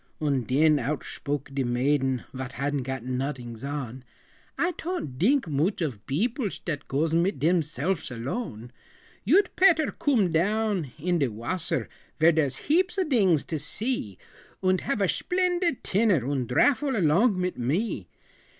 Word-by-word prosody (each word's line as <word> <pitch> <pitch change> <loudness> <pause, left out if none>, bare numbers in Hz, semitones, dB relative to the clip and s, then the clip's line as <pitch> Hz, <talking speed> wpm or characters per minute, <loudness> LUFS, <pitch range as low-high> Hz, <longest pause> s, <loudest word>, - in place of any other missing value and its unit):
Und 140 -6 0
den 150 +3 +4
outshpoke 140 +1 -3
de 135 -1 0
maiden 130 +1 +1
Vot 130 0 -5
hadn't 140 +2 -1
got 130 -1 -4
nodings 125 -2 -4
on: 135 -3 -5 0.5
"I 350 - +1
ton't 325 - -5
dink 255 - +3
mooch 155 +7 0
of 130 - -3
beoplesh 225 - -1
Dat 150 -4 -4
goes 155 +4 0
mit 170 0 +2
demselfs 160 +1 0
alone. 120 - -5 0.5
"You'd 360 - +3
petter 340 -5 +4
coom 225 - +1
down 195 - 0
in 175 +3 0
de 140 - +2
wasser, 120 - -2 0.3
Vere 160 +2 +6
dere's 150 -5 +1
heaps 360 +4 +2
of 370 -5 0
dings 190 - +3
to 160 - -4
see, 165 - 0 0.5
Und 185 0 +2
have 275 -7 -2
a 195 - +3
shplendid 355 - 0
tinner 195 - +2
Und 135 -4 -1
drafel 270 - +2
along 190 +3 +3
mit 180 -4 -2
me. 140 - -1
160 Hz, 145 wpm, -26 LUFS, 135-215 Hz, 0.5 s, Vere